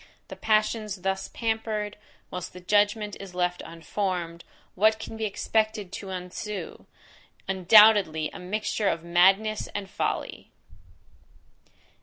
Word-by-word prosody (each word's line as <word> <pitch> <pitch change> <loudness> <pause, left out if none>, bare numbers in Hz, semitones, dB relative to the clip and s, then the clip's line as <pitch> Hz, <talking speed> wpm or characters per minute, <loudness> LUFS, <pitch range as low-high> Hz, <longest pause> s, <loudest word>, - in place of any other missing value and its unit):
The - - -7
passions 215 -3 0
thus 190 0 -1
pampered, 220 -2 -2 0.4
whilst 180 -1 -6
the 180 - -9
judgment 205 +2 +1
is 190 -2 -10
left 180 0 0
unformed, 170 0 -4 0.3
what 220 +3 +3
can 220 - -8
be 220 0 -2
expected 215 -1 -1
to 195 0 -7
ensue? 190 +3 -6 0.6
Undoubtedly, 190 -4 +5
a - - -8
mixture 205 +3 -2
of 165 - -2
madness 195 +5 +3
and 205 -1 -3
folly! - - -3
200 Hz, 115 wpm, -26 LUFS, 180-215 Hz, 0.6 s, Undoubtedly